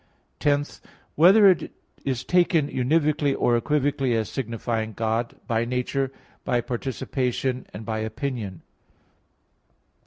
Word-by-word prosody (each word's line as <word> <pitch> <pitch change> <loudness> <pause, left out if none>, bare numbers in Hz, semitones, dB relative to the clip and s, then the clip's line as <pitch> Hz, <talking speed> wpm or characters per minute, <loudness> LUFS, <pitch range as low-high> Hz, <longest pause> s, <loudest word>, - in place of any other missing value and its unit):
(10) 145 -1 +2 0.5
Whether 195 +6 +7
it 185 -3 +3 0.3
is 130 -3 -2
taken 175 -2 +3
univocally 145 +2 +1
or 120 - +3
equivocally 135 -1 +1
as 110 -3 -1
signifying 115 -3 -3
God, 115 +2 -1
by 115 -2 0
nature, 125 +2 -1 0.3
by 120 - +1
participation, 125 +1 -2
and 110 +2 -8
by 110 -1 -2
opinion? 110 - -4
125 Hz, 105 wpm, -25 LUFS, 115-145 Hz, 0.5 s, Whether